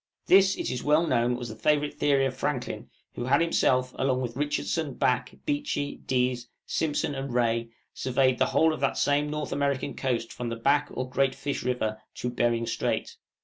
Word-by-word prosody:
This 195 +1 +6
it - - -2
is 125 - -3
well 150 +3 +4
known 120 -3 +2
was 120 -1 -5
the 110 - -7
favorite 150 +5 +1
theory 140 -2 +2
of 130 -1 -2
Franklin, 130 -2 -3 0.2
who 120 - -4
had 140 +3 +4
himself, 130 -6 +2
along 130 -1 +1
with 120 -2 -4
Richardson, 145 +1 -1
Back, 125 0 0
Beechey, 290 - -2
Dease, 125 -1 0 0.2
Simpson, 150 -2 -1
and 135 -1 -4
Rae, 115 -1 +1 0.2
surveyed 130 0 +1
the - - +3
whole 160 0 +3
of - - -5
that 135 0 0
same 145 +1 +2
North 150 0 -3
American 140 -1 -1
coast 120 -4 -2
from 120 -1 -4
the 115 - -3
Back 140 +5 +2
or 130 +1 -4
Great 130 +1 +1
Fish 140 0 -3
River 110 -3 -2
to 125 - -3
Behring 120 -1 +1
Strait. - - -2
130 Hz, 190 wpm, -27 LUFS, 125-145 Hz, 0.2 s, This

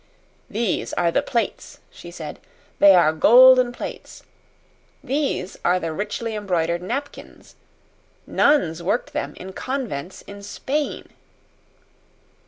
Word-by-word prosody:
"These 215 -2 -2
are 170 -1 +1
the - - +2
plates," 230 -4 -3
she 175 - -12
said. 160 -3 -8 0.4
"They 200 -1 +8
are 160 -3 +4
golden 250 +7 +7
plates. 245 - -9 0.8
These 270 -10 -2
are 180 +1 +2
the 165 -2 -4
richly 210 +5 -4
embroidered 175 -5 -1
napkins. 270 +10 -7 0.7
Nuns 175 - +2
worked 240 - -2
them 300 - -4
in 190 +1 -9
convents 215 - -5
in 200 0 -11
Spain." 280 +8 -4
200 Hz, 110 wpm, -22 LUFS, 175-255 Hz, 0.8 s, They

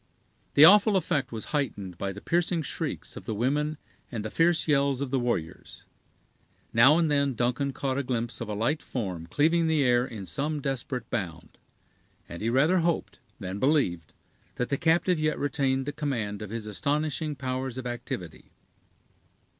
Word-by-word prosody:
The 150 - +10
awful 205 +3 +7
effect 155 -7 -1
was 110 +4 -7
heightened 105 -11 -2
by 100 - -2
the 100 +2 -9
piercing 170 -1 0
shrieks - - -4
of - - -9
the 110 - -2
women 145 +7 0 0.3
and 110 -4 -4
the 110 - -4
fierce 165 0 +2
yells 140 -3 +2
of 140 -2 -3
the 135 - +2
warriors. 120 -10 -3 0.9
Now 130 +7 +7
and 170 -1 +3
then 140 -3 +1
Duncan 125 +4 0
caught 135 0 -2
a - - -1
glimpse 120 -2 -3
of 115 - -4
a 105 - -2
light 120 +9 0
form 95 -9 -4
cleaving 165 - +2
the 155 -3 +2
air 120 -1 +4
in 110 -6 -7
some 145 - -2
desperate 130 -3 -3
bound, 85 -8 -5 0.7
and 85 - -8
he 115 - 0
rather 150 +9 +3
hoped 170 0 -1 0.2
than 95 -1 -5
believed 115 - +1 0.4
that 125 - -2
the 140 - 0
captive 170 +1 +2
yet 155 0 0
retained 135 -2 0
the 145 - -3
command 115 -9 -3
of 105 - -6
his 115 0 -5
astonishing 150 +7 -1
powers 130 -1 -3
of 130 - -5
activity. 120 -9 -6
130 Hz, 170 wpm, -27 LUFS, 115-150 Hz, 0.9 s, The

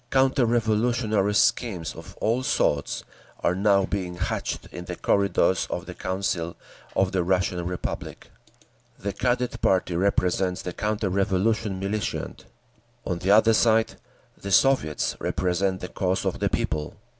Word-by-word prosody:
Counter 130 -1 +3
revolutionary 110 -2 +1
schemes 95 -6 +1
of - - -12
all 115 +4 +1
sorts 75 - 0 0.4
are - - +2
now 100 0 +3
being 95 -2 -3
hatched 90 - -3
in - - -7
the - - -5
corridors 100 -2 +2
of - - -4
the - - -7
Council 95 -3 -2 0.4
of 95 -1 +2
the 95 -2 +1
Russian 90 -1 0
Republic. 90 -1 -5 0.7
The 100 0 -4
Cadet 125 0 -1
party 90 -2 +2
represents 90 0 +1
the 90 - -4
counter 105 -1 -1
revolution 100 +1 0
militant. 100 -1 -3 0.6
On 90 -2 -2
the 90 +2 -2
other 110 +2 +6
side, 110 0 +3 0.4
the 100 - -7
Soviets 115 - +2
represent 95 +1 0
the 90 - -4
cause 95 0 -1
of - - -1
the - - +1
people. 75 0 -2
95 Hz, 140 wpm, -25 LUFS, 90-110 Hz, 0.7 s, other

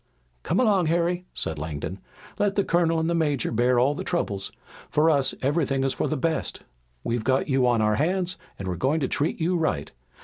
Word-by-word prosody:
"Come 175 - 0
along, 200 -8 +3
Harry," 175 +2 0
said 80 -2 -4
Langdon. 80 +5 -5 0.4
"Let 205 -1 +1
the 200 - +3
colonel 165 -2 +2
and 160 - 0
the 170 - +1
major 150 -5 0
bear 120 +2 +2
all 130 +4 +3
the - - -5
troubles. 100 - -2 0.4
For 155 +2 +3
us 140 -3 +2
everything 135 -1 +1
is 135 - +1
for - - -1
the 155 - -1
best. 160 +3 -2 0.4
We've 115 -1 -1
got 130 +3 +1
you 130 -2 +3
on 115 -3 +3
our 105 0 +2
hands 180 +3 +1 0.2
and 95 - -6
we're 90 -2 -2
going 145 - +1
to 135 - +1
treat 150 +5 -1
you 170 +3 +1
right. 155 - -1
145 Hz, 205 wpm, -25 LUFS, 120-170 Hz, 0.4 s, along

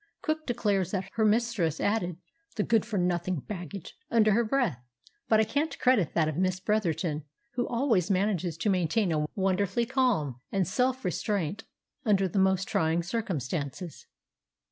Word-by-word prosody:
Cook 310 0 -2
declares 205 -7 +1
that 190 -2 -2
her 225 - +1
mistress 215 -7 +1
added 185 -5 0 0.4
"the 210 - +1
good 225 -1 +2
for 215 -3 -2
nothing 180 0 0
baggage" 180 -1 -7
under 215 -2 +4
her 230 +4 +3
breath; 230 - 0 0.5
but 220 - +5
I - - +5
can't 285 +9 -1
credit 245 - +2
that 160 -2 +3
of 155 -1 -2
Miss 185 0 +1
Bretherton, 175 -7 0 0.3
who 245 0 -1
always 230 - +1
manages 185 -4 0
to 185 +6 0
maintain 185 +2 +1
a 150 -1 0
wonderful 195 +3 +1
calm 225 - 0
and 195 -3 +1
self 255 +4 0
restraint 200 +2 -1 0.4
under 195 -3 +3
the 190 +2 -1
most 190 0 +2
trying 160 +1 +1
circumstances. 170 - -4
195 Hz, 155 wpm, -28 LUFS, 175-225 Hz, 0.5 s, but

